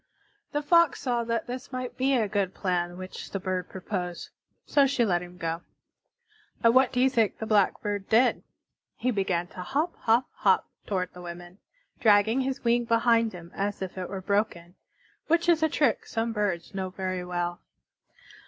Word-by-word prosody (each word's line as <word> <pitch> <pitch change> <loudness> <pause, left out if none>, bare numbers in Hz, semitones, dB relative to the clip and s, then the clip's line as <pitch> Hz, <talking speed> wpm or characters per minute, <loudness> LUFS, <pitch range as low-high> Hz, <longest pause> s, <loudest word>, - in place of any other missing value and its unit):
The 295 0 -1
Fox 335 -1 +4
saw 240 -3 0
that 230 -1 -1
this 250 +2 -7
might 255 -1 -4
be 270 +1 +2
a 225 -4 +2
good 200 -2 -1
plan 175 -2 -1
which 185 0 -8
the 195 - -3
bird 185 -1 -3
proposed, 180 -2 -5 0.4
so 280 -2 +4
she 265 -3 +2
let 175 -4 +1
him 180 0 -10
go. 165 0 -3 1.0
And 230 0 +6
what 260 0 +5
do 250 - -1
you 260 - +5
think 230 -5 +1
the 220 - -4
Blackbird 205 -1 +1
did? 240 +3 +4 0.5
He 255 - 0
began 190 -5 0
to 185 - -8
hop, 290 - -1
hop, 235 +3 +3
hop - - +3 0.2
toward 185 -3 -2
the 180 - -10
women, 175 +2 -9 0.4
dragging 220 +3 +4
his 265 0 -3
wing 240 0 +2
behind 230 -1 +3
him 175 -2 -11
as 200 +1 -2
if 185 - -6
it 185 -1 -5
were 195 -1 -5
broken, 190 -3 -1 0.5
which 335 +2 +2
is 335 -2 +4
a 315 - +3
trick 285 -6 +1
some 225 0 -1
birds 200 -6 -2
know 190 -1 -3
very 185 -1 -3
well. 175 -1 -3
205 Hz, 180 wpm, -27 LUFS, 180-245 Hz, 1.0 s, And